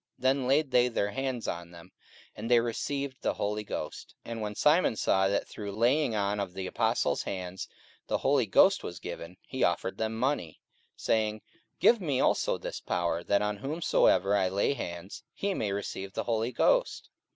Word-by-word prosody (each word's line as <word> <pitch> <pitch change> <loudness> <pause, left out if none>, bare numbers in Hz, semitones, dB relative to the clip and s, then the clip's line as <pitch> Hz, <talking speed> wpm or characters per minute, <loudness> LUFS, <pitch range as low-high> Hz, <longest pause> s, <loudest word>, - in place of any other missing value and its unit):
44:008:017 - - -19
Then 130 0 +2
laid 140 +1 +2
they 125 -1 +5
their 105 -4 -1
hands 130 0 -3
on 85 0 -4
them, 85 -1 -14 0.4
and 110 +2 -5
they 120 -1 +6
received 130 +3 -3
the - - 0
Holy 105 +1 -2
Ghost. 75 -6 -6
44:008:018 - - -7
And 115 -1 -4
when 105 -1 -4
Simon 150 - +3
saw 95 -2 +2
that 100 +1 0
through 105 -2 -6
laying 120 +4 +2
on 100 0 0
of 95 -3 -3
the 95 - -4
apostles' - - +1
hands 95 -1 -5 0.4
the - - +1
Holy - - +2
Ghost - - +5
was 85 - -6
given, 85 0 -8
he 130 - -2
offered 90 +2 0
them 110 0 -1
money, 125 - -1 0.4
44:008:019 - - -13
Saying, 110 -1 +1 0.4
Give 235 -3 +5
me 145 -7 0
also - - +2
this - - -6
power, 85 -1 -1
that 100 +3 +2
on 105 0 -1
whomsoever 105 - +2
I 95 -2 +2
lay 100 +8 +1
hands, 85 -6 -6
he 200 0 -1
may 105 - -1
receive 100 -1 -4
the - - -2
Holy 115 +1 0
Ghost. - - +1
105 Hz, 190 wpm, -29 LUFS, 95-130 Hz, 0.4 s, they